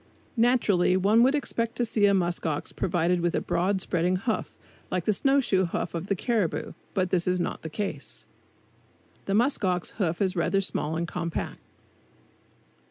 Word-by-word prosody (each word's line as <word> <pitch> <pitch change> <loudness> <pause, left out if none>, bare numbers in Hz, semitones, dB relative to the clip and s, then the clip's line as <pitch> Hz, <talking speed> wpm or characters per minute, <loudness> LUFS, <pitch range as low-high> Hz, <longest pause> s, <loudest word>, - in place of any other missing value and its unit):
Naturally 220 -7 +3
one 205 +5 +4
would 265 +4 +4
expect 230 -5 -2
to 240 - 0
see 210 -2 +3
a 200 - +4
musk 175 -2 0
ox 150 -2 -2
provided 175 0 0
with 175 0 0
a - - +2
broad, 190 +2 0
spreading 180 0 +1
hoof, 215 +4 -2 0.3
like 180 -2 -2
the 215 - +3
snow 270 +7 +3
shoe 190 -8 +2
hoof 170 - -3
of 170 +2 -4
the 200 - +1
caribou; 210 -3 -1 0.2
but 185 -2 0
this 175 -2 +2
is 180 0 +2
not 175 - -3
the 160 - -6
case. 175 -6 -5 1.0
The 195 - 0
musk 240 +2 +2
ox 180 -2 0
hoof 170 -2 0
is 190 -1 +1
rather 180 +3 +1
small 160 -5 -2
and 170 +1 -2
compact. 170 0 -4
185 Hz, 175 wpm, -27 LUFS, 175-215 Hz, 1.0 s, one